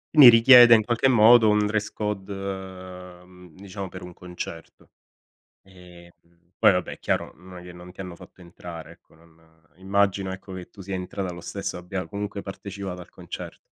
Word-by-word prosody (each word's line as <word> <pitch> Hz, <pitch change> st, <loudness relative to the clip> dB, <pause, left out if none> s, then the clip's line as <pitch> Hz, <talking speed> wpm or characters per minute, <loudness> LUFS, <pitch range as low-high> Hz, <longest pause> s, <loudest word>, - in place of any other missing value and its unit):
Mi 135 Hz, -5 st, +11 dB
richiede 120 Hz, 0 st, +8 dB
in 110 Hz, -, +2 dB
qualche 120 Hz, +3 st, +1 dB
modo, 115 Hz, -1 st, +6 dB
un 105 Hz, 0 st, +2 dB
dress 105 Hz, 0 st, -2 dB
code 105 Hz, -2 st, -5 dB
uhm, 90 Hz, -2 st, -9 dB
diciamo 95 Hz, 0 st, -8 dB
per 90 Hz, -1 st, -10 dB
un 90 Hz, -, -10 dB
concerto. 90 Hz, -2 st, -10 dB, 0.7 s
Ehm, 90 Hz, -2 st, -16 dB, 0.5 s
poi -, -, +5 dB
vabbè 90 Hz, -1 st, -2 dB
è -, -, -15 dB
chiaro, -, -, -2 dB
non 90 Hz, +2 st, -13 dB
glie 90 Hz, 0 st, -12 dB
non 90 Hz, +1 st, -12 dB
ti 90 Hz, -, -24 dB
hanno 90 Hz, -2 st, -7 dB
fatto -, -, -17 dB
entrare, 85 Hz, -2 st, -11 dB
ecco, -, -, -28 dB
non 80 Hz, -1 st, -26 dB
immagino, 95 Hz, 0 st, 0 dB
ecco, 95 Hz, 0 st, -9 dB
che 90 Hz, -1 st, -9 dB
tu 100 Hz, -, -21 dB
sia 95 Hz, 0 st, -5 dB
entrata 90 Hz, 0 st, -5 dB
lo 85 Hz, -, -10 dB
stesso, -, -, -5 dB
abbia 90 Hz, +1 st, -6 dB
comunque 100 Hz, +2 st, -6 dB
partecipato 95 Hz, -2 st, -8 dB
al -, -, -14 dB
concert -, -, -9 dB
95 Hz, 175 wpm, -24 LUFS, 90-100 Hz, 0.7 s, Mi